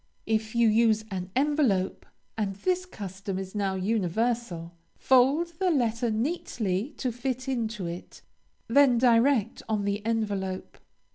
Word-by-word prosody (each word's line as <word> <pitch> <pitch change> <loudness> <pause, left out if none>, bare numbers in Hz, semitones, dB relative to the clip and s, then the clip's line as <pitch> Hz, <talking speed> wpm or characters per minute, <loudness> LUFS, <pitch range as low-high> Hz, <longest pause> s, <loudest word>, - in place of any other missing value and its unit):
If 220 0 -1
you 235 -1 +4
use 220 0 +3
an 185 -1 -4
envelope, 265 -9 +1 0.3
and 205 -3 -2
this 365 - -1
custom 195 - -6
is 190 0 -6
now 200 -2 -1
universal, 195 -2 -1 0.2
fold 275 +7 +3
your 375 - +3
letter 240 -6 +1
neatly 225 - -2
to 255 - -1
fit 255 +2 -3
into 225 -6 -2
it; 170 +1 -8 0.4
then 255 0 +5
direct 235 -1 +3
on 210 -2 0
the 205 +1 -1
envelope. 205 -4 -2
225 Hz, 130 wpm, -27 LUFS, 195-250 Hz, 0.4 s, then